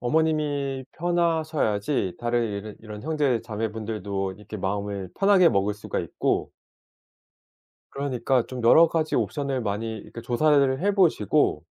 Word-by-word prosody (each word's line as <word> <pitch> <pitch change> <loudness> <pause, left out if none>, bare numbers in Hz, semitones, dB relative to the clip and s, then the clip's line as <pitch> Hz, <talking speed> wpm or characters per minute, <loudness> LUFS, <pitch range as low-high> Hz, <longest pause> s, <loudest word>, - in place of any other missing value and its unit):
어머님이 145 -1 0
편하셔야지 155 - 0
다르 120 0 -1
이러 105 -2 -3
이런 105 -1 -9
형제자매 125 -8 -1
분들도 105 -3 -4
이렇게 105 +2 -9
마음을 100 0 -3
편하게 195 -3 +6
먹을 100 -2 +1
수가 105 - -4
있고 - - -1 1.4
그러니까 130 -3 0
좀 125 -2 -6
여러 160 +8 +7
가지 160 -1 -1
옵션을 140 -3 -1
많이 110 +1 -3
이렇게 115 - -10
조사를 135 +2 +2
해 200 +2 +2
보시고 170 - +2
125 Hz, 310 characters per minute, -25 LUFS, 105-155 Hz, 1.4 s, 여러